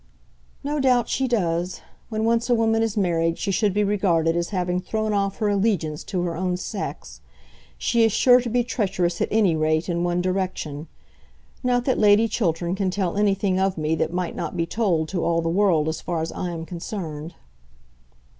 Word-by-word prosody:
"No 295 +1 -1
doubt 250 -4 +2
she 265 - 0
does. 180 -6 -1 0.3
When 220 -1 -1
once 230 +1 +1
a 240 - +4
woman 225 0 +2
is 225 -2 -1
married 165 -3 +1
she 200 - -2
should 205 +2 +2
be 210 +2 +1
regarded 175 -5 +1
as 170 0 -1
having 180 -2 -1
thrown 215 +3 -2
off 200 -1 0
her 215 - 0
allegiance 195 -7 0
to 180 -3 -2
her 170 -2 -2
own 180 +1 -1
sex. 200 +2 -6 0.6
She 235 -1 +2
is 225 - +4
sure 250 +4 +5
to 240 - -4
be 245 +1 +1
treacherous 185 -7 -1
at - - +2
any 205 -6 +3
rate 155 +1 +1
in 170 0 0
one 175 0 0
direction. 180 -5 -2 0.7
Not 245 -1 +1
that 260 - +1
Lady 210 +1 +5
Chiltern 175 -5 -1
can 190 -1 0
tell 185 -2 -1
anything 200 -2 +1
of 190 -1 0
me 155 0 0
that 160 - 0
might 180 0 -3
not 165 - -4
be 165 - +1
told 170 -5 0
to 180 -3 -2
all 165 0 +1
the 165 0 -1
world 170 -4 +2
as 160 - -3
far 170 -2 -2
as 165 - -4
I 180 - -4
am 165 -1 -5
concerned." 165 -3 -6
185 Hz, 195 wpm, -23 LUFS, 170-215 Hz, 0.7 s, sure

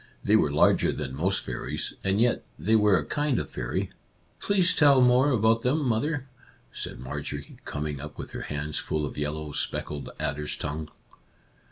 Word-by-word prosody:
They 105 - +4
were 75 -10 +3
larger 75 - +4
than 65 - -4
most 95 +7 0
fairies, - - -4
and 95 +1 +1
yet 120 +1 +2
they 100 +9 +2
were 105 -3 +5
a - - -2
kind 145 -4 0
of - - -3
fairy." - - -3 0.3
" - - -37
Please 190 -3 +4
tell 140 -3 +6
more 125 +2 +5
about 115 -3 +3
them, 140 +4 +1
mother," 135 +4 0 0.5
said - - -6
Marjorie, 70 +3 -6
coming 75 -1 -4
up 75 0 -8
with - - -7
her - - -5
hands 75 +1 -2
full 75 -1 -2
of 70 - -6
yellow, 75 +1 -3
speckled 75 0 -3
adder's 75 +1 -2
tongue. 75 +1 -4
95 Hz, 175 wpm, -27 LUFS, -, 0.5 s, tell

